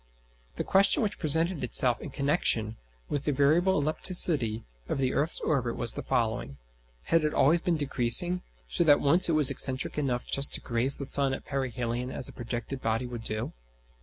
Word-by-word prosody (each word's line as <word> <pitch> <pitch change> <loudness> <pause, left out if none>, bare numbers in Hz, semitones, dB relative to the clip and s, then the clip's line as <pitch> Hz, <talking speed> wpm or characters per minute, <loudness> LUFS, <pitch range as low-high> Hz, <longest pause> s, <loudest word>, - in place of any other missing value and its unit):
The - - -3
question 195 +3 +2
which 210 -1 -3
presented 160 +1 0
itself 125 0 +1
in - - -7
connexion 135 -6 -1 0.3
with 145 -1 -4
the 150 - 0
variable 155 +7 +2
ellipticity 145 - +2 0.3
of - - -2
the 130 -1 -1
earth's 155 +4 -1
orbit 125 -6 -1
was 120 -2 +1
the - - -6
following: 110 - -3 0.5
Had 165 -1 +1
it 150 - -2
always 165 +5 +3
been 170 -2 -1
decreasing, 145 +5 +2 0.3
so 115 - 0
that 145 -3 +4
once 170 +6 +4
it - - +1
was 150 -3 +7
excentric 130 +3 +1
enough 125 -4 -2
just 140 0 +2
to - - -3
graze 120 +3 0
the 140 - -6
sun 135 0 +1
at - - -12
perihelion 125 -2 -4
as 130 - -3
a - - -6
projected 120 +2 -6
body 115 +2 -2
would 120 -2 -8
do? 110 0 -5
135 Hz, 185 wpm, -27 LUFS, 120-155 Hz, 0.5 s, was